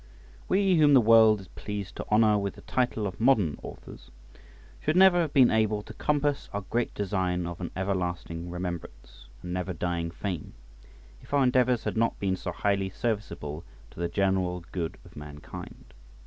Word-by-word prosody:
WE 190 -2 +3
whom 145 -2 +6
the - - +8
world 110 -2 +6
is 95 - -13
pleased 100 -2 -6
to - - -6
honour 105 0 +5
with 100 -1 -2
the - - -13
title 120 -4 -1
of 95 -1 -5
modern 110 - +3
authors, - - -11 0.7
should 155 - 0
never 185 -1 +6
have 160 -4 -1
been 130 -4 +5
able 110 -1 +1
to - - -10
compass 145 -1 0
our 100 - -2
great 120 0 0
design 95 -3 -1
of 85 +1 -6
an 85 - -3
everlasting 90 -3 -3
remembrance 85 -9 -7 0.2
and 90 0 -5
never 90 0 -2
dying 85 0 -2
fame 85 -1 -5 0.7
if - - -4
our 140 - +4
endeavours 125 -2 +3
had - - -3
not 115 +1 +1
been 95 -2 0
so 90 - -5
highly 100 +1 0
serviceable 95 -8 -4 0.3
to - - -13
the 85 0 -1
general 95 -3 0
good 85 -3 -3
of - - -16
mankind. 75 0 -10
100 Hz, 175 wpm, -28 LUFS, 90-115 Hz, 0.7 s, the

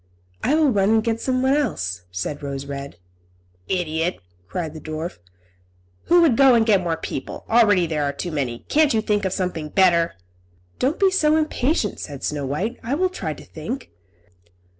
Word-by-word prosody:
"I 295 - +3
will 310 -3 +4
run 200 -2 +2
and 220 0 +3
get 230 0 -1
someone 260 +1 +1
else," 90 - -1
said 95 +11 -4
Rose 140 -1 -5
Red. 140 -7 -7 0.7
"Idiot!" 170 -1 -1 0.3
cried 160 - -4
the 155 - -9
dwarf. 155 - -5 0.9
"Who 350 0 +5
would 295 -8 +4
go 270 0 +6
and 225 -1 +4
get 205 -4 +4
more 170 -2 -1
people? 135 - -6
Already 210 -6 +4
there 155 -2 -1
are 140 - 0
two 140 +5 -5
too 160 - -6
many. 125 -5 -2
Can't 300 -4 +3
you 220 - +2
think 205 -2 0
of 190 - 0
something 180 -5 -3
better?" 170 -2 +3 0.6
"Don't 280 +6 0
be 390 -1 +4
so 310 -5 +3
impatient," 300 - 0
said 140 -2 -7
Snow 145 -2 -2
White. 190 - -2
"I 250 +5 -1
will 370 +4 +1
try 370 - -4
to - - -13
think." 260 +1 -6
190 Hz, 180 wpm, -22 LUFS, 150-255 Hz, 0.9 s, go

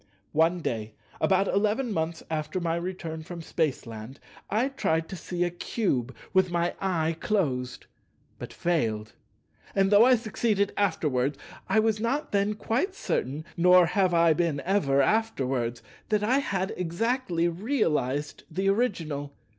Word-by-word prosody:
One 165 +3 +3
day, 110 -6 -3 0.2
about 195 +1 +3
eleven 215 +4 +1
months 160 -1 -2
after 155 +2 -2
my 165 -1 0
return 170 -2 -4
from 170 +1 -8
Spaceland, 130 -7 -3 0.3
I 230 +6 +1
tried 165 -11 0
to 190 - -5
see 175 +1 -2
a 175 - 0
Cube 140 - -2 0.2
with 190 -1 +4
my 175 0 0
eye 165 -4 0
closed, 130 -12 -1 0.5
but - - -7
failed; 110 -11 -1 0.6
and 195 0 +3
though 205 +2 +8
I 255 +1 +6
succeeded 215 -3 0
afterwards, 145 -9 0 0.3
I 220 - +4
was 215 -1 +2
not 265 +7 -1
then 205 +1 +1
quite 260 - -1
certain 145 - -2
(nor 180 +1 +6
have 185 +2 +2
I 165 -1 +5
been 160 -3 0
ever 140 -8 +3
afterwards) 130 - 0 0.3
that 210 -1 +1
I 255 +6 +3
had 195 -8 -2
exactly 180 0 0
realized 165 - -1
the 190 +4 0
original. 165 - -1
175 Hz, 140 wpm, -27 LUFS, 150-205 Hz, 0.6 s, though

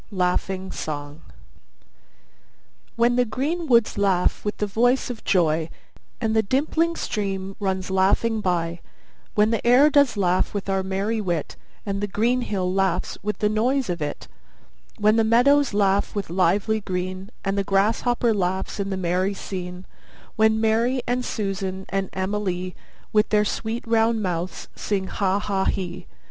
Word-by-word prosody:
LAUGHING 190 0 -1
SONG 145 0 -6 1.7
When 240 +1 +3
the 250 - +5
green 285 +9 -2
woods 235 -4 +3
laugh 190 -3 +1
with 210 - -3
the 210 - 0
voice 245 +5 +1
of 230 - -9
joy, 160 -3 +2 0.5
And 220 -2 0
the 220 - +5
dimpling 315 +9 0
stream 195 -6 -3
runs 190 -2 -2
laughing 200 +4 +2
by; 170 -3 -1 0.6
When 210 +1 +4
the 230 - -1
air 255 +5 +6
does 285 -6 +4
laugh 185 +1 +1
with 200 -1 -3
our 195 0 +1
merry 195 +4 -1
wit, 175 -6 -2 0.3
And 200 -1 -2
the 205 - -1
green 235 +5 +1
hill 185 -5 -1
laughs 190 -2 0
with 210 +1 -2
the 210 - +1
noise 240 +1 +1
of 170 -2 -4
it; 145 -1 -4 0.7
When 215 +2 +3
the 225 - +4
meadows 265 +6 +4
laugh 200 0 +1
with 200 -5 -3
lively 195 +5 +2
green, 185 0 -4 0.2
And 195 0 0
the 200 - +1
grasshopper 225 +4 +2
laughs 190 0 -2
in 195 0 -2
the 190 - -2
merry 185 +2 0
scene; 180 -1 -6 0.5
When 220 0 +3
Mary 230 +3 +1
and 250 +1 0
Susan 195 -4 -3
and 195 -1 -1
Emily 185 -2 -2 0.4
With 210 -1 +3
their 210 -1 +3
sweet 230 +3 -3
round 225 -1 +2
mouths 180 -1 -3
sing 195 -2 -2
'Ha 195 0 0
ha 195 -2 -1
he! 180 -2 -3
200 Hz, 155 wpm, -23 LUFS, 185-225 Hz, 1.7 s, air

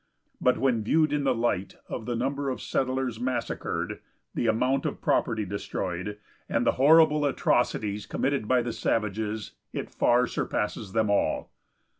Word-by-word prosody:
But 125 - +3
when 125 -5 +1
viewed 155 +6 +3
in 145 -1 0
the 130 -2 +3
light 115 -5 -1
of 110 - -5
the 120 - -1
number 140 +3 -1
of 130 - -3
settlers 130 -3 -1
massacred, 125 0 -2 0.3
the 120 - 0
amount 125 +5 +2
of 145 - -4
property 110 -3 +1
destroyed, 95 0 -4 0.3
and - - +1
the - - +5
horrible 150 +1 +6
atrocities 110 -6 0
committed 135 -5 -1
by 125 0 +3
the 120 -1 -3
savages, 110 0 -1 0.2
it - - -4
far 125 +1 +3
surpasses 105 -4 -3
them 110 -2 +2
all. 100 - 0
120 Hz, 150 wpm, -27 LUFS, 105-135 Hz, 0.3 s, horrible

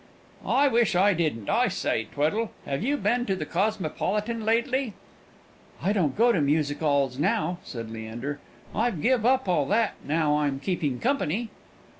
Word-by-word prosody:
"Wish 240 -8 +3
I 200 +3 +5
didn't. 155 - -1
I - - +3
say, 110 -1 -1
Tweddle, 175 +10 0 0.2
have 135 +2 -2
you 280 +7 +1
been 245 -2 0
to 195 - +1
the 155 - -4
Cosmopolitan 210 +5 -1
lately?" 235 +1 0 0.8
"I 200 - +1
don't 165 -10 0
go 240 +2 +5
to 180 - +1
music 145 +1 +1
'alls 140 -4 +1
now," 165 +3 0
said 115 -3 -7
Leander; 115 +6 -5 0.3
"I've 225 -5 0
give 245 -3 +3
up 260 -3 +2
all 155 -6 +2
that 220 +3 +2
now 150 0 +1
I'm 140 -2 0
keeping 145 -6 -2
company." 235 - -1
180 Hz, 155 wpm, -26 LUFS, 145-230 Hz, 0.8 s, I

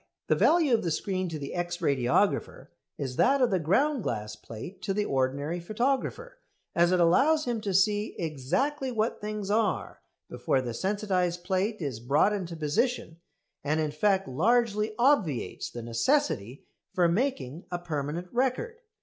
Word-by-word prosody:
The - - +5
value 325 -6 +4
of 230 - +3
the 170 - 0
screen 185 +3 -2
to 160 - -4
the 140 -2 -6
X 175 0 -2
radiographer 140 -7 0 0.3
is 130 -3 -4
that 275 +2 +4
of 250 -4 +3
the 190 - +2
ground 260 - +2
glass 105 - -3
plate 115 - -10
to 195 +1 -2
the 210 0 0
ordinary 140 +4 -1
photographer, 265 - -2 0.3
as 170 +1 +3
it 185 - +3
allows 285 - +4
him 240 -3 -2
to 205 -2 -2
see 205 +3 +2
exactly 185 - -1
what 225 -1 -1
things 210 -1 -4
are 210 -4 0 0.3
before 135 - 0
the 125 -2 -4
sensitised 185 - -1
plate 190 +1 -1
is 130 -6 -3
brought 140 - +2
into 180 -4 -4
position, 165 - -1 0.5
and 150 +2 0
in 155 -1 0
fact 195 +5 +1
largely 215 - +1
obviates 235 - +1
the 120 - -7
necessity 115 - 0 0.3
for 175 -2 +4
making 170 - -1
a 175 - -2
permanent 165 0 -4
record. 265 - -1
185 Hz, 160 wpm, -28 LUFS, 150-225 Hz, 0.5 s, The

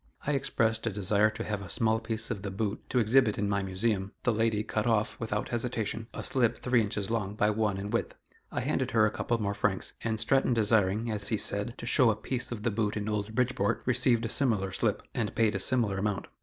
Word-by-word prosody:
I 150 - 0
expressed 115 -5 0
a - - +3
desire 105 +1 +2
to 110 - -6
have 105 -2 -3
a 95 - -9
small 110 +4 +1
piece 110 0 -3
of 100 - -3
the 100 - -4
boot 100 +2 -3
to 125 - -1
exhibit 115 -1 +3
in 105 - 0
my 100 0 0
Museum; 95 +1 -1
the 120 - +2
lady 110 -1 +1
cut 110 +1 -2
off, 110 -1 +1
without 105 -2 -2
hesitation, 115 -2 -3
a - - -6
slip 125 -3 +1
three 125 -2 +2
inches 105 -1 -3
long 105 -3 -2
by 105 0 +2
one 105 -2 0
in 100 +2 -5
width. 115 - -1 0.4
I - - -2
handed - - -1
her 110 -2 +4
a 105 - +1
couple 120 +2 -1
more 100 -1 -1
francs, 95 -2 -1
and 110 -1 -1
Stratton 125 +2 +2
desiring, 110 0 +2
as 105 -1 -2
he 110 - +1
said, 100 +3 +2
to - - -7
"show 125 0 +4
a 110 - +2
piece 125 +4 -2
of 110 -3 -5
the 120 - +1
boot 105 0 -1
in 105 0 -3
old 105 0 -2
Bridgeport," 115 -4 0
received 120 -2 +2
a - - -2
similar 110 -8 +1
slip, - - 0
and - - -2
paid 110 -2 +2
a 100 - -2
similar 105 -3 +2
amount. 100 -1 -1
110 Hz, 235 wpm, -29 LUFS, 105-115 Hz, 0.4 s, her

